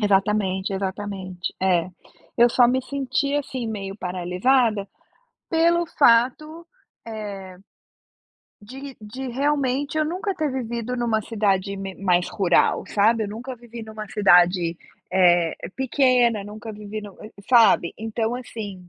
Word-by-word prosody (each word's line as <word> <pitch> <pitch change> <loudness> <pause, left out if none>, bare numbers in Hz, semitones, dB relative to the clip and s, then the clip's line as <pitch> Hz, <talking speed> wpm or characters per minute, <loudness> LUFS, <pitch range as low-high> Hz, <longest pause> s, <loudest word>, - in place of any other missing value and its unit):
Exatamente, 195 -1 +1
exatamente. 190 -1 -4
É. 180 -2 +2 0.5
Eu 240 0 +6
só 245 0 +5
me 260 +1 +1
senti, 280 +1 -2
assim, 265 -4 -3
meio 200 -3 -5
paralisada, 195 +5 +1 0.6
pelo 340 +1 +2
fato, 305 +6 +2 0.4
eh, 200 -4 -7 1.1
de 265 +5 -9
de 255 +5 -7
realmente 280 +2 0
eu 310 - +2
nunca 370 +4 -3
ter 310 -4 -1
vivido 240 -1 -3
em 240 - -2
uma 225 -2 +1
cidade 200 -3 -1
me 195 -1 -6
mais 180 -2 +1
rural, 190 -5 +2
sabe. 220 +2 +2
Eu - - -5
nunca 240 +5 -7
vivi 235 -1 -11
em 220 -1 -9
uma 215 -1 -7
cidade, 175 -4 +4 0.4
eh, 175 -3 +4 0.2
pequena. 250 -4 +2
Nunca 215 +2 -8
vivi 210 +1 -7
no 205 -2 -11 0.3
sabe. 230 -8 +5
Então, 225 +1 -2
assim 205 -7 -7
220 Hz, 130 wpm, -23 LUFS, 195-255 Hz, 1.1 s, Eu